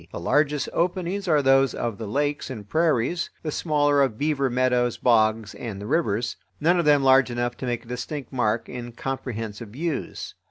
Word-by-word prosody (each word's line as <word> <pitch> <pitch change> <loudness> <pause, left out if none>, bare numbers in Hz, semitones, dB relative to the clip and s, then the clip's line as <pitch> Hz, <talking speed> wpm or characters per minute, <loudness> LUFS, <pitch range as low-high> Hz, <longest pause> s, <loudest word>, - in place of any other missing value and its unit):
The - - -6
largest 145 - +1
openings 185 +2 -1
are 150 -4 +3
those 135 0 +4
of 115 -3 -3
the 110 - -5
lakes 145 +7 -1
and 110 -6 -7
prairies, 160 +1 +1
the 155 - -2
smaller 145 -2 +2
of 130 -6 +1
beaver 145 -2 0
meadows, 125 -1 +1
bogs, 110 -3 +2
and 110 -5 -6
the 100 - -7
rivers; 115 -4 0 0.2
none 175 +4 +3
of 170 - +1
them 145 -2 +5
large 130 -1 +5
enough 120 0 -2
to 130 - -5
make 120 -1 -2
a - - -18
distinct 125 +4 -5
mark 115 -3 0
in 120 -1 -7
comprehensive 115 -4 -5
views. 155 +7 -4
130 Hz, 185 wpm, -24 LUFS, 115-150 Hz, 0.2 s, them